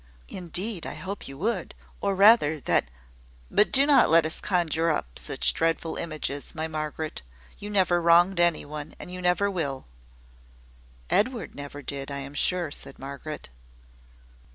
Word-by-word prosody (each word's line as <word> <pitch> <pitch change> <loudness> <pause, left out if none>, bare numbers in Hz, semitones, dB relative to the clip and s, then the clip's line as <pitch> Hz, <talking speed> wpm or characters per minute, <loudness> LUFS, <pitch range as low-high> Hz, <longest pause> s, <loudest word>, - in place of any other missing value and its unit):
"Indeed, 180 +2 -1
I - - -6
hope 195 +2 -6
you 135 - -9
would: 220 +9 -2 0.3
or 200 -1 0
rather, 195 -7 +6
that - - +2 0.4
" - - -28
"But 210 - +3
do 275 +1 +7
not 290 -1 +5
let 165 0 +5
us 160 - -3
conjure 165 -3 +1
up 65 - -2
such 60 0 +2
dreadful 165 0 -1
images, 155 -3 -4
my 160 0 -2
Margaret. 155 - -4 0.4
You 205 - -7
never 185 -4 +2
wronged 175 +2 +5
any 175 -2 +2
one, 150 +1 -7
and - - -9
you 180 0 -6
never 180 +3 +2
will." 140 -8 -3 1.3
"Edward 230 -1 +1
never 145 0 -8
did, 140 0 -4
I 140 - -4
am 140 0 -6
sure," 175 +1 0
said - - -8
Margaret. 140 +3 -7
165 Hz, 155 wpm, -26 LUFS, 145-185 Hz, 1.3 s, do